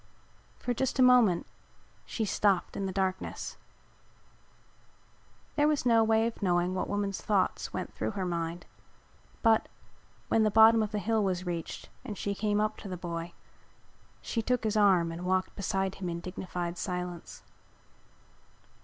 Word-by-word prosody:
For 245 - -2
just 265 +3 -1
a 260 - +5
moment 245 -9 +5 0.6
she 225 - -2
stopped 200 -2 +1
in 195 - -2
the - - -3
darkness. 190 0 -3 2.0
There 295 0 +3
was 300 -4 +1
no 230 -2 +5
way 220 0 +3
of 230 -1 -4
knowing 180 -1 +1
what 185 - -2
woman's 200 -1 -2
thoughts 200 -3 0
went - - -5
through - - -2
her 190 - -1
mind 170 0 -3 0.8
but, 225 -2 +4 0.6
when 225 - +3
the 215 - +4
bottom 220 +1 +7
of 215 -1 -1
the 210 - -2
hill 220 +1 +1
was 185 -2 -1
reached 170 -2 -5
and 215 -6 -6
she 200 - -2
came 210 0 0
up 215 0 0
to - - -9
the 185 -1 -5
boy, 170 0 -5 0.9
she 230 - -1
took 250 +1 0
his 215 -1 0
arm 190 -5 +4
and 165 +1 -6
walked 185 +1 0
beside 195 -1 -1
him 185 -2 -5
in 170 0 -3
dignified 180 -1 -5
silence. 180 -2 -5
195 Hz, 155 wpm, -30 LUFS, 180-220 Hz, 2.0 s, bottom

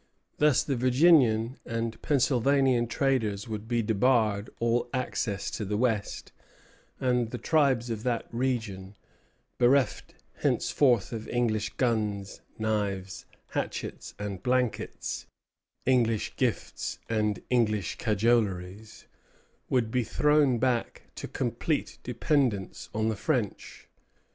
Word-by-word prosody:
Thus 150 -3 +4
the 140 - -1
Virginian 125 -2 +4
and 115 -1 -3
Pennsylvanian 135 -2 +2
traders 115 -5 0
would 110 -1 -5
be 120 -1 +1
debarred 110 -1 +2
all 120 +1 +1
access 110 -5 -2
to 110 - -4
the 105 +1 -2
West, 110 -4 -1 0.7
and 125 -3 +1
the 125 - -5
tribes 130 -3 +2
of 110 -2 -3
that 120 -1 -1
region, 110 -6 -2 0.6
bereft 125 -1 +2 0.2
henceforth 125 -7 +2
of 110 -1 -6
English 110 -4 0
guns, 105 -5 -1 0.2
knives, 100 -3 -2 0.2
hatchets, - - -4
and 100 -2 -5
blankets, 125 +1 -1 0.6
English 115 -4 +1
gifts - - -2
and 105 -2 0
English 110 -6 +1
cajoleries, 105 -2 0 0.6
would 120 -4 +1
be 125 0 +1
thrown 150 +1 +3
back 125 -1 -1
to - - -6
complete 130 +5 -2
dependence 125 - -1
on 110 +1 0
the 110 - -1
French. 120 -2 -3
115 Hz, 110 wpm, -28 LUFS, 105-125 Hz, 0.7 s, Thus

